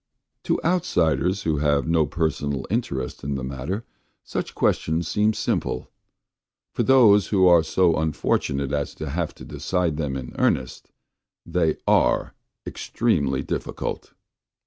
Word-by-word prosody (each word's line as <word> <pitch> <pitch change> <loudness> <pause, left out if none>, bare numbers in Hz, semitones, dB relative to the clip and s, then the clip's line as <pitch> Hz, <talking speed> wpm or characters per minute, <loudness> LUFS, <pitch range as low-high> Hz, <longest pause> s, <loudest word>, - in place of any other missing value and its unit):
To - - +1
outsiders 95 - +1
who 80 -2 0
have 70 0 +1
no 80 -2 +2
personal 70 -3 -2
interest 70 - -2
in 70 +1 -2
the 65 - -4
matter 70 - -4 0.4
such - - -4
questions 80 +1 0
seem 105 +5 +2
simple; 65 - -2 0.8
for - - 0
those 110 -7 +5
who 95 -3 +3
are 85 -2 +7
so 85 +1 +2
unfortunate 70 -3 -1
as 70 -1 -2
to 75 -3 -5
have 85 +1 -2
to - - -11
decide 90 -5 -1
them 70 -4 -2
in 65 -2 -7
earnest 65 -1 0 0.6
they 85 -2 0
are - - +2 0.3
extremely 70 - -1
difficult. - - -4
80 Hz, 130 wpm, -24 LUFS, 70-90 Hz, 0.8 s, are